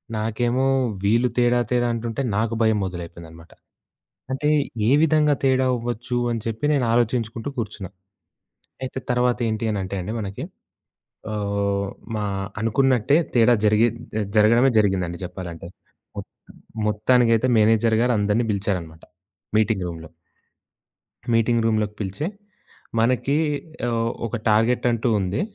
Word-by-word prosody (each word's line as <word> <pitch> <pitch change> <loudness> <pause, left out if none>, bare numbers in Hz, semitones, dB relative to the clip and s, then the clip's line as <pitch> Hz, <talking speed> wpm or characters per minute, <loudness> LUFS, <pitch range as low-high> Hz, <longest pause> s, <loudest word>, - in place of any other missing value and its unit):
నాకేమో 120 +4 0 0.4
వీళ్ళు 115 +5 +3
తేడా, 120 0 +3
తేడా 120 -1 +2
అంటుంటే 115 +3 -3
నాకు 110 +2 0
భయం 110 -1 +3
మొదలైపోయిందన్నమాట. 85 -2 -9 0.8
అంటే, 150 +3 0 0.4
ఏ - - +3
విధంగా 150 -2 +3
తేడా 130 -1 +3
అవ్వచ్చు, 120 +1 -3
అని 115 - -2
చెప్పి 115 +5 -3
నేను 135 -4 +1
ఆలోచించుకుంటూ 115 +1 0
కూర్చున్నా. 105 -5 -5 0.9
అయితే 130 0 -4
తర్వాతేంటి 120 -3 0
అనంటే 100 -1 -3
అండి 100 +5 -5
మనకి, 100 -2 -5 0.9
ఆహ్, 100 -1 -1 0.3
మా 105 - -2 0.4
అనుకున్నట్టే 130 +3 +2 0.2
తేడా 120 +1 +5
జరిగి 105 +3 +4 0.5
జరగడమే 115 +5 +5
జరిగిందండి 95 -4 0
చెప్పాలంటే. 85 -2 -7 0.5
మొత్త - - -7 0.6
మొత్తానికైతే 115 +2 +3
మేనేజర్ 110 +1 +3
గారు 125 -1 +2
అందరిని 105 +3 +1
పిలిచారన్నమాట. 90 -5 -3 0.5
మీటింగ్ 105 -3 +1
రూమ్‌లో. 80 -1 -8 1.3
మీటింగ్ 115 0 +2
రూమ్‌లోకి 105 -2 0
పిలిచి, 100 +9 -3 0.7
"మనకి 130 +5 +2 0.5
ఆహ్, 115 0 0 0.2
ఒక 115 - -4
టార్గెట్ 115 +4 +2
అంటూ 115 0 0
ఉంది. 95 +1 -1
115 Hz, 115 wpm, -23 LUFS, 100-120 Hz, 1.3 s, తేడా